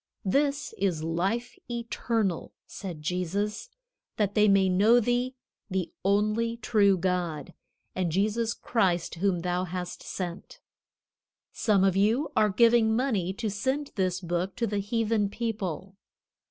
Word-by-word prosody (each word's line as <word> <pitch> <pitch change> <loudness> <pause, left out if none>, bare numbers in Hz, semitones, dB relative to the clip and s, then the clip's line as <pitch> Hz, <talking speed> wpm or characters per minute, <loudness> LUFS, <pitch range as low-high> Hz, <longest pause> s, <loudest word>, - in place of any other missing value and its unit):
"This 280 +7 +1
is 180 -5 0
life 195 +9 -2
eternal," 230 -5 -2
said 175 -6 -8
Jesus, 195 - -2 0.5
"that 205 -2 +1
they 210 -1 +4
may 195 -1 +5
know 205 +6 +5
thee, 245 +2 0 0.3
the 185 -3 -2
only 215 +4 +1
true 205 -4 +3
God, 175 -2 -2 0.4
and 180 -3 -1
Jesus 215 +5 0
Christ 185 -7 0
whom 180 0 0
thou 180 +1 -1
hast 180 0 -5
sent." 175 -2 -6 0.9
Some 205 -4 +2
of 190 -1 +3
you 220 +9 +2
are 210 - +4
giving 230 +1 +4
money 220 -8 0
to 220 0 -3
send 260 +8 -2
this 185 -1 -1
Book 175 +2 -2
to 235 - 0
the 205 -2 -1
heathen 215 0 0
people. 200 -5 -4
200 Hz, 130 wpm, -28 LUFS, 180-230 Hz, 0.9 s, may